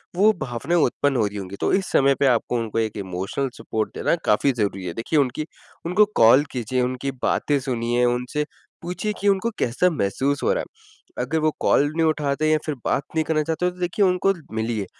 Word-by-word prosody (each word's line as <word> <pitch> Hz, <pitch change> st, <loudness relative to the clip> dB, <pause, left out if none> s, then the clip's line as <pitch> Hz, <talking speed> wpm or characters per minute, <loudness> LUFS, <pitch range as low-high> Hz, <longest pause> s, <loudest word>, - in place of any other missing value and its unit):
वो 205 Hz, +4 st, +5 dB
भावनाएँ 130 Hz, +8 st, -1 dB
उत्पन्न 145 Hz, -1 st, +1 dB
हो 115 Hz, -, +2 dB
रही 105 Hz, 0 st, -7 dB
होंगी, 95 Hz, 0 st, -6 dB
तो -, -, -1 dB
इस 190 Hz, -1 st, 0 dB
समय 140 Hz, 0 st, +4 dB
पे -, -, +3 dB
आपको 120 Hz, -1 st, +1 dB
उनको 115 Hz, 0 st, -2 dB
एक 110 Hz, -2 st, -2 dB
इमोशनल 95 Hz, +8 st, -3 dB
सपोर्ट 110 Hz, -1 st, -3 dB
देना -, -, +1 dB
काफ़ी 120 Hz, +6 st, +3 dB
ज़रूरी 100 Hz, -5 st, -2 dB
है। 85 Hz, -, -4 dB
देखिए 135 Hz, -, 0 dB
उनकी 140 Hz, +3 st, 0 dB, 0.4 s
उनको 185 Hz, +5 st, +4 dB, 0.2 s
कॉल 120 Hz, +5 st, +7 dB
कीजिए, 125 Hz, 0 st, -1 dB
उनकी 130 Hz, +2 st, -2 dB
बातें 145 Hz, -2 st, +1 dB
सुनिए, 120 Hz, -2 st, 0 dB
उनसे 125 Hz, +5 st, -1 dB, 0.4 s
पूछिए 180 Hz, +5 st, -3 dB
कि 205 Hz, -, -1 dB
उनको 200 Hz, +3 st, +2 dB
कैसा 130 Hz, +10 st, +2 dB
महसूस 140 Hz, -, -1 dB
हो -, -, +3 dB
रहा -, -, -1 dB
है। 430 Hz, -, -10 dB
अगर 160 Hz, +5 st, -1 dB
वो 155 Hz, 0 st, +2 dB
कॉल -, -, +3 dB
नहीं 165 Hz, -, +2 dB
उठाते 150 Hz, -1 st, 0 dB
या 155 Hz, -, +4 dB
फिर 150 Hz, -, -2 dB
बात 140 Hz, -, +1 dB
नहीं 160 Hz, -, +2 dB
करना 155 Hz, -1 st, +1 dB
चाहते 165 Hz, +3 st, 0 dB
तो 180 Hz, -, -17 dB
देखिए 180 Hz, +3 st, +1 dB
उनको 185 Hz, +1 st, +2 dB, 0.2 s
मिलिए, 110 Hz, -2 st, -1 dB
140 Hz, 205 wpm, -23 LUFS, 115-165 Hz, 0.4 s, कॉल